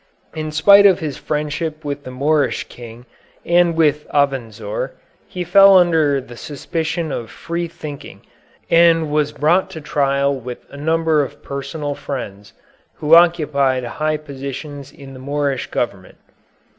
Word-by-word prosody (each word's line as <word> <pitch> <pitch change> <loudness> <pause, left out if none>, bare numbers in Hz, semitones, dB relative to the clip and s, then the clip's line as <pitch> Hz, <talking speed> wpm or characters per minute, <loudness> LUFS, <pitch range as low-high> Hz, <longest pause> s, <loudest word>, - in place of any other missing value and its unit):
In 155 -1 -4
spite 200 +6 +7
of 190 -3 +4
his 150 -4 -5
friendship 150 +1 -3
with 145 0 -5
the - - -6
Moorish 145 +3 0
King 120 0 -12 0.4
and 170 -1 +3
with 150 -2 +1
Avenzoar, 115 -7 -2 0.3
he 180 - -5
fell 195 +2 +7
under 160 -6 +3
the 120 -2 -11
suspicion 160 +4 -4
of 115 -4 -5
free 170 +7 -4
thinking 150 -3 -10 0.5
and 165 -2 +4
was 150 -1 +1
brought 170 +7 +1
to 180 -4 -8
trial 140 -2 0
with 125 -1 -8
a - - -11
number 160 +1 +1
of 135 - -9
personal 145 +1 -5
friends, 105 -8 -7 0.4
who 155 0 0
occupied 150 -6 +4
high 155 +5 -2
positions 140 -1 -8
in 135 -1 -13
the 130 - -11
Moorish 140 0 -2
government. 100 -6 -4
150 Hz, 140 wpm, -19 LUFS, 135-160 Hz, 0.5 s, spite